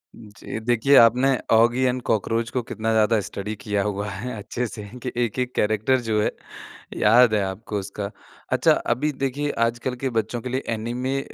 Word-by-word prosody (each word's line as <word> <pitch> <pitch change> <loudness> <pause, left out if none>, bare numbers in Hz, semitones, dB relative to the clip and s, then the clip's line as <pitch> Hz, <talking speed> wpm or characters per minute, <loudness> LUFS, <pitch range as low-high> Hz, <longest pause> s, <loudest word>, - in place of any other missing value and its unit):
जी, 105 0 -8
देखिए 120 +4 +3
आपने 125 +4 +6 0.2
Oggy 120 +3 +4
and 125 0 +1
cockroach 115 +1 0
को 125 - -1
कितना 115 0 -3
ज़्यादा 110 0 +3
स्टडी 105 +2 -5
किया 105 -2 -1
हुआ 100 0 -2
है 110 +6 -5
अच्छे 120 +4 -4
से 105 -1 -8 0.2
कि 125 - -3
एक-एक 125 +2 -2
कैरेक्टर 110 +5 +2
जो 110 -2 0
है, - - +1 0.7
याद 115 +2 +5
है, 105 - +2
आपको 100 +2 -4
उसका। 100 +1 -6 0.4
अच्छा - - +4 0.2
अभी 150 +3 -1
देखिए 145 +2 -1 0.2
आजकल 120 +2 -3
के 130 - +2
बच्चों 110 +2 -4
के 125 - -5
लिए 130 +2 -2
ऐनिमे 125 +4 -2
115 Hz, 175 wpm, -23 LUFS, 105-125 Hz, 0.7 s, आपने